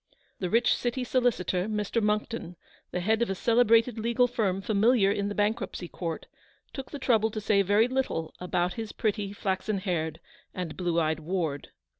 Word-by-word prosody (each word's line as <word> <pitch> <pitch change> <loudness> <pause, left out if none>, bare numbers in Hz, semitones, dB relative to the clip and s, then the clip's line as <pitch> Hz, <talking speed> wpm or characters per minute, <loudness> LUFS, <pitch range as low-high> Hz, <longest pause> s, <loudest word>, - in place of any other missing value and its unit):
The 180 - -2
rich 230 +4 +4
City 245 +1 -2
solicitor, 230 -7 +1
Mr. 215 +1 -1
Monckton, 210 -3 -1 0.3
the 180 - -3
head 220 +5 +1
of 235 - +1
a 195 - -1
celebrated 230 +1 +3
legal 235 +3 +2
firm 215 -6 0
familiar 210 +1 +3
in 200 0 -1
the 205 - -4
Bank 210 +2 +1
ruptcy 175 - -5
Court, 165 -2 -5 0.5
took 270 -2 -6
the 290 - -6
trouble 225 -5 +2
to 215 - -4
say 210 -1 +3
very 205 +4 +3
little 255 -11 -2
about 180 0 0
his 225 -2 -6
pretty, 205 -2 -1
flaxen 200 +1 -2
haired, 165 -5 -2 0.4
and 180 -4 -4
blue 175 -2 0
eyed 160 -1 0
ward. 160 -3 -3
205 Hz, 175 wpm, -28 LUFS, 180-230 Hz, 0.5 s, rich